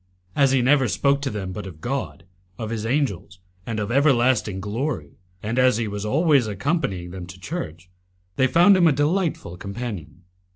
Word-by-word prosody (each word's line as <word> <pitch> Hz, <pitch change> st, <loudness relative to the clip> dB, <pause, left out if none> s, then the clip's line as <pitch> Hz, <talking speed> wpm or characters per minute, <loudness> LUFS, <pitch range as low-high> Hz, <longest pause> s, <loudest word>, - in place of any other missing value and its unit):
As 140 Hz, -2 st, +4 dB
he 130 Hz, -2 st, +3 dB
never 135 Hz, 0 st, +4 dB
spoke 140 Hz, +2 st, +1 dB
to 140 Hz, -, -1 dB
them 100 Hz, -5 st, -4 dB
but 100 Hz, +1 st, -6 dB
of 85 Hz, -4 st, -10 dB
God, 130 Hz, -3 st, -4 dB, 0.3 s
of 110 Hz, -1 st, -5 dB
His 115 Hz, -1 st, -3 dB
angels, 115 Hz, -, -1 dB, 0.3 s
and 110 Hz, -2 st, -2 dB
of 105 Hz, +1 st, -3 dB
everlasting 125 Hz, -7 st, +3 dB
glory, 105 Hz, -, -3 dB, 0.3 s
and 115 Hz, +4 st, -1 dB
as 130 Hz, -3 st, +4 dB
he 115 Hz, -2 st, -1 dB
was 105 Hz, 0 st, -4 dB
always 140 Hz, -1 st, +3 dB
accompanying 100 Hz, -, -2 dB
them 90 Hz, -1 st, -7 dB
to 95 Hz, +1 st, -11 dB
church, 90 Hz, -, -6 dB, 0.5 s
they 130 Hz, -, +3 dB
found 175 Hz, +7 st, +6 dB
him 175 Hz, -2 st, +5 dB
a -, -, +5 dB
delightful 145 Hz, -, -1 dB
companion. 100 Hz, -, -6 dB
120 Hz, 175 wpm, -23 LUFS, 100-140 Hz, 0.5 s, found